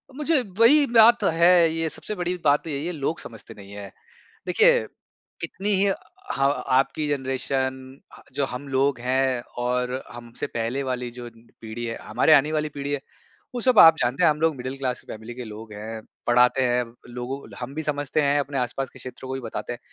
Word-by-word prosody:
मुझे 300 +1 +1 0.2
वही 285 +6 +7
बात 230 +1 +7
तो - - +2
है 170 +2 +4 0.2
ये, 165 0 -1
सबसे 210 - -6
बड़ी 175 -1 -2
बात 145 0 +4
तो - - -7
यही 145 0 -3
है, 175 - -2
लोग 155 0 -3
समझते 115 -2 -11
नहीं 100 -1 -12
हैं। 100 -1 -8 0.6
देखिए 485 +2 +5 0.6
कितनी 200 +2 -4
ही 195 +1 +3 0.5
ह 135 0 +3 0.3
आपकी 150 +3 0
जनरेशन 130 -1 -2 0.2
ह - - -15
जो 140 - +1
हम 130 +2 -7
लोग 135 -1 +1
हैं, 130 0 +1 0.2
और 125 +1 -1
हमसे 120 0 -7
पहले 120 +4 -2
वाली 125 -2 -3
जो 120 0 -8 0.3
पीढ़ी 115 +1 -6
है, 115 0 -4
हमारे 160 - +3
आने 150 +1 +4
वाली 155 -1 -1
पीढ़ी 145 -1 -5
है, 145 - -1 0.6
वो 245 - -2
सब 250 -2 +3
आप 160 -1 +9
जानते 135 +9 +1
हैं 155 - +7
हम 150 - -3
लोग 160 -3 +2
मिडल 130 +2 -5
क्लास 130 -2 -3
फ़ैमिली 110 +2 -8
के 125 0 -7
लोग 110 0 -10
हैं, 110 +2 -7 0.2
पढ़ाते 125 +2 +4
हैं 125 0 +2 0.3
लोगों 125 +3 -4 0.2
हम 125 +3 -6
भी 160 - -3
समझते 145 0 -1
हैं, 145 0 +2
अपने 140 -1 -3
आस-पास 125 +1 -2
के - - -15
क्षेत्रों 130 +1 -9
को - - -2
भी 135 - -4
बताते 115 0 -5
हैं। 120 - -7
135 Hz, 200 wpm, -24 LUFS, 125-155 Hz, 0.6 s, आप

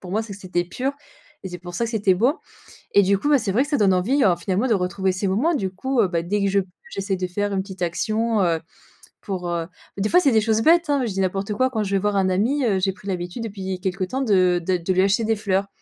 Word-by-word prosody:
pour 180 - -9
moi 220 +2 +1
ça 205 -3 -8
c'était 185 -3 -2
pur, 255 +10 -3 0.5
et 190 - -5
c'est 180 0 -7
pour 175 0 -9
ça 235 - 0
c'était 210 -5 +1
beau. 245 - +1 0.6
Et 200 - +7
du 195 +1 +2
coup, 290 - -1
bah 290 - +6
c'est 220 -5 -2
vrai 230 +7 +2
que 290 - -1
ça 290 - +1
donne 195 -3 +4
envie, 250 +10 +2
heu, 185 -4 +5
finalement, 195 +6 -1
de 225 - +3
retrouver 190 0 0
ces 190 +2 -2
moments. 235 - +1
Du 195 - -1
coup, 255 +7 -1
heu, 200 - +3
bah, 170 -2 -1
dès 205 +4 -1
que 200 - +2
je 200 +1 +2
p 185 - -10 0.2
j'essaie 195 0 -2
de 185 0 -3
faire 205 +3 -2
une 190 - 0
petite 190 -2 -7
action 215 +5 0
heu, 165 -2 +1 0.6
pour 185 -3 -4
heu 170 -1 -2
bah - - -31 0.3
des 205 +2 0
fois 360 - +6
c'est 275 -8 +3
des 220 - +4
choses 220 0 +1
bêtes, 335 +3 +4
hein, 280 -3 +2
je 215 - -3
dis 195 - -1
n'importe 195 +2 -1
quoi, 255 +5 +1
quand 220 -4 -1
je 195 - -4
vais - - +3
voir 205 0 0
un 190 - +2
ami, 245 +9 +1
heu, 195 -5 +2
j'ai 195 - +2
pris 190 +1 -14
l'habitude, 180 +4 -4
depuis 190 -3 -5
quelque 190 0 -2
temps, 255 +9 -3
de 185 -6 +3
dé 185 0 +1
de 170 +3 -2
lui 185 - +3
acheter 200 +4 +2
des 220 -1 +1
fleurs. 195 -1 0
195 Hz, 290 wpm, -22 LUFS, 185-225 Hz, 0.6 s, Et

